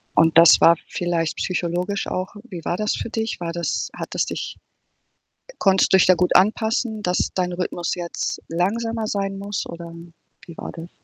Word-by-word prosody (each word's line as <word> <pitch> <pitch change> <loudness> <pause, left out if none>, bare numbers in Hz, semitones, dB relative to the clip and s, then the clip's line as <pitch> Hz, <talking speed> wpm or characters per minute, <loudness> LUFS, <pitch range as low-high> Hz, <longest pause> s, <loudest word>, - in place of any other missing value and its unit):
Und 165 0 +4
das 170 0 +8
war 170 - +7
vielleicht 170 -2 -2
psychologisch 180 +2 -2
auch 185 +2 -4
wie 170 -4 -7
war 175 - -1
das 210 0 0
für - - -5
dich? 225 -3 -3
War 170 -1 -3
das 170 0 -2
hat - - -6
es - - +1
dich - - -5 1.0
konntest 190 -1 +3
du - - +8
dich - - +5
da 185 - +7
gut 180 +1 +1
anpassen, 220 +2 +1
dass 180 -1 0
dein 180 -1 -1
Rhythmus 175 -1 -2
jetzt 175 -1 -4
langsamer 220 +6 -1
sein 195 -1 -2
muss 200 0 -4
oder 170 0 -8 0.5
wie 170 - -11
war - - -7
das? 165 0 -9
180 Hz, 180 wpm, -22 LUFS, 170-205 Hz, 1.0 s, das